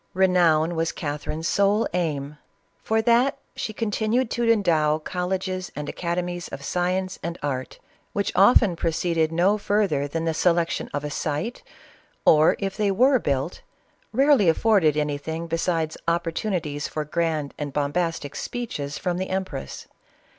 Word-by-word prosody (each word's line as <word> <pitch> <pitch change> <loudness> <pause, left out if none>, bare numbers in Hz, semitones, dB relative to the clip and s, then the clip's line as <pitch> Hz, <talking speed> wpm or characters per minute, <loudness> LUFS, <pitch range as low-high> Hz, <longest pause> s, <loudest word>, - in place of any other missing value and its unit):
Renown 175 -4 +3
was 165 0 0
Catherine's 150 +2 -4
sole 200 +2 +2
aim. 150 -4 -2 0.4
For 220 0 +1
that 240 +4 +3 0.2
she - - -3
con 215 0 -3
tinued 225 +3 0
to 235 -1 +2
endow 160 -8 +2
colleges 185 +2 -3
and 150 +1 -5
academics 175 +1 -3
of 140 - -8
science 185 +1 -1
and 170 +1 -4
art, 130 -3 -3 0.3
which 200 -1 -1
often 200 -1 +5
proceeded 165 -1 0
no 185 +6 +2
further 200 -9 +1
than 165 +3 -3
the 165 - +1
selection 170 +1 +1
• 145 - 0
•(' 145 - -8
;i - - -1
site, 150 - -3 0.6
or, 155 0 +6
if 195 -1 -3
they 210 -1 +1
were 255 +7 +4
built, 140 -1 -2 0.5
rarely 265 - +4
afforded 165 -4 +3
anything 150 +3 -2
s 165 - 0 0.4
opportxinities 170 -3 -1
for 155 -1 -3
grand 155 -2 -1
and 145 -1 -3
bombastic 145 +1 -1
speeches 160 - -4
from 180 -1 -2
the 190 - -3
empress. 185 - -4
170 Hz, 145 wpm, -24 LUFS, 155-200 Hz, 0.6 s, or